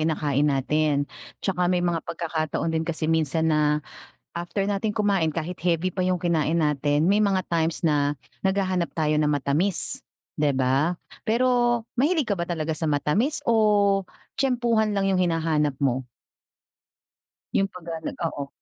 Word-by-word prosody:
kinakain 150 -2 +1
natin, 145 +1 +1 0.4
'tsaka 180 -2 +1
may 180 -1 +1
mga 170 -2 0
pagkakataon 160 -1 -2
din 160 - +1
kasi 160 -1 -3
minsan 160 0 +1
na 150 0 +2 0.5
after 175 +3 -2
natin 205 +1 -1
kumain 195 -7 +1
kahit 165 +2 -4
heavy 175 +2 +1
pa 185 0 -1
'yong 180 -2 0
kinain 165 -2 +1
natin, 150 +1 +2
may 205 - +4
mga 200 -3 +2
times 165 -1 0
na 145 -3 +2 0.3
naghahanap 185 -3 0
tayo 155 -2 +1
ng 150 - +2
matamis 150 +6 0 0.4
'di 145 -2 +2
ba? 135 +6 +2 0.3
Pero, 240 0 +2 0.2
mahilig 300 0 +2
ka 195 - 0
ba 170 - -2
talaga 160 -2 -2
sa 160 +1 -2
matamis 150 - +1
o 205 -3 +3 0.3
tyempuhan 235 -5 +1
lang 195 -1 +1
yung 190 - +2
hinahanap 160 -5 +1
mo? 130 -1 0 1.5
Yung 195 - +2
pag, 180 -3 -12 0.4
ah, 165 - -1
oo. 140 - -4
165 Hz, 150 wpm, -25 LUFS, 150-195 Hz, 1.5 s, may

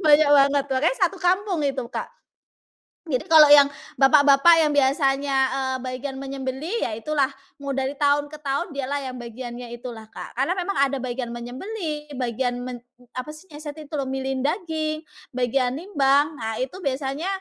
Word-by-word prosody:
Banyak 295 0 +6
banget 280 0 +4
makanya 290 - +2
1 385 - -12
kampung 370 -1 +1
itu 270 -3 -1
Kak. - - -5 1.0
Jadi 255 -4 0
kalau 310 -2 +9
yang 285 -1 +8 0.3
bapak-bapak 285 +3 +7
yang 295 - 0
biasanya, 275 0 +2 0.2
eee, 260 -1 -1
bagian 260 +1 -5
menyembelih 275 - -4
ya - - -4
itulah, 285 +2 0 0.3
mau 280 - -4
dari 270 +1 -2
tahun 290 0 +2
ke 305 - -8
tahun 280 +3 -2
dialah 280 +1 -2
yang - - -9
bagiannya 240 0 -8
itulah 235 -2 -8
Kak. - - -9
Karena 275 +7 +1
memang 390 +2 -2
ada 275 0 +2
bagian 245 -1 -4
menyembelih, 300 - -6
bagian 245 0 -2
men 245 -2 -7 0.3
apa 255 +4 -5
sih 310 +4 -12
yang 295 - -9
satu 295 0 -7
itu 300 +1 -11
loh? 275 - -1
Milihin 265 -1 -2
daging, 315 -2 -2 0.3
bagian 255 +1 0
nimbang. 290 -4 +2
Nah 225 -1 -3
itu 260 +7 -3
biasanya 275 +2 -2
275 Hz, 165 wpm, -23 LUFS, 260-300 Hz, 1.0 s, kalau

